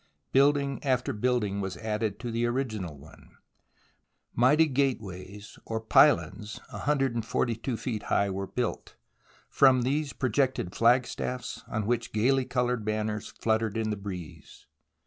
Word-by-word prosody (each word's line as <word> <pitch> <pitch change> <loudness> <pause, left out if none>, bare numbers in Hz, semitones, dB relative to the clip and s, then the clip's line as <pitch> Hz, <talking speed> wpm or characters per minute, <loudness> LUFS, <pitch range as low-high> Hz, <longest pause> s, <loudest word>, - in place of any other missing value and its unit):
Building 140 0 +3
after 130 0 0
building 105 -3 0
was 95 -1 -4
added 110 -1 -2
to 120 -1 -4
the 115 +1 0
original 110 - -3
one. 75 +4 -17 1.0
Mighty 145 +7 +5
gateways, 105 - -3
or 110 0 -3
pylons, 110 -1 +3
142 120 -3 -1
feet 110 -4 -3
high, 100 -1 +1
were 95 +1 -3
built, 125 +2 -3
and - - -44 0.2
from 130 -2 +5
these 140 +3 0
projected 130 -6 0
flagstaff 125 +1 +2
s - - -7
on 110 -2 -2
which 120 +1 -1
gaily 130 +5 +2
coloured 125 -2 0
banners 105 0 -2
fluttered 110 -1 -1
in 110 -1 -1
the - - -1
breeze. 95 -5 -9
115 Hz, 130 wpm, -28 LUFS, 105-130 Hz, 1.0 s, Mighty